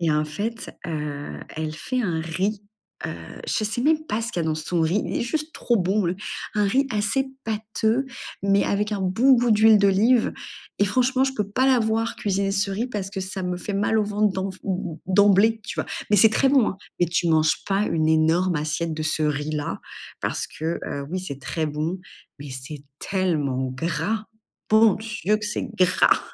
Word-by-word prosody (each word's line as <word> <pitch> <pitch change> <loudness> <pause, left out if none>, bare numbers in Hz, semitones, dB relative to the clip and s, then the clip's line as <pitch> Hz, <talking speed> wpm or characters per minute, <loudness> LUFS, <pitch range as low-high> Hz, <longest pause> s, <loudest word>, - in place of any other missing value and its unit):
et 165 -2 +2
en 150 0 +2
fait, 210 +10 -4 0.2
heu, 150 -3 -4 0.2
elle 155 -1 -3
fait 255 +11 -2
un 175 -8 -1
riz, 190 +6 -2 0.4
heu, - - -3 0.4
je 215 - 0
sais 225 +3 -1
même 310 +2 +2
pas 220 +2 -1
ce 230 - -3
qu'il 170 - -1
y - - -2
dans 155 - +1
son 160 +2 -2
riz, 170 +6 +2
il - - -3
est - - -1
juste 305 +5 -3
trop 240 - +1
bon, 190 +1 +1
heu! 180 - -2 0.4
Un 210 -1 +2
riz 265 +8 +2
assez 215 +6 0 0.2
pâteux, 220 +3 0 0.4
mais 200 0 +3
avec 210 +1 0
un 200 - -2
bon 225 +9 +4
goût 240 -1 +2
d'huile 215 0 +6
d'olive. 205 +5 +4 0.5
Et 205 - +4
franchement, 255 +5 +2
je 270 - 0
peux 210 -5 -2
pas 255 +6 +1
la 260 -2 +5
voir 225 0 0
cuisiner 195 -1 0
ce 195 0 0
riz 210 +5 -1
parce 200 -5 -4
que 195 - -4
ça 190 0 -4
me 180 0 -2
fait 200 +2 -4
mal 205 +2 +2
au 215 - +2
ventre 210 0 +1
d'emv 190 0 -3
em 200 - -2 0.2
em - - -13
d'emblée, 205 +3 +4
tu - - -6
vois? - - -4 0.2
Mais 210 - +5
c'est 220 +3 +7
très 270 +5 +3
bon, 265 -5 +4
hein! - - -8 0.2
Mais 175 - +4
tu 170 0 0
manges 160 -1 +2
pas 195 +1 +1
une 155 -1 +1
énorme 160 +3 +3
assiette 155 +2 -2
de 155 - -4
ce 155 0 0
riz 150 0 -1
là, 150 -1 -3 0.4
parce - - -2
que, 165 +2 -3
heu, 140 0 -4
oui 185 - -1
c'est 140 -7 -6
très 160 +3 -2
bon, 155 +5 -2 0.4
mais 140 -1 -8
c'est 135 +3 -7
tellement 145 -9 -1
gras. 170 +9 -2 0.5
Bon 220 -1 +6
Dieu 215 -1 -1
que 215 - -6
c'est 210 - -3
gras! 185 0 +4
195 Hz, 210 wpm, -24 LUFS, 160-220 Hz, 0.5 s, c'est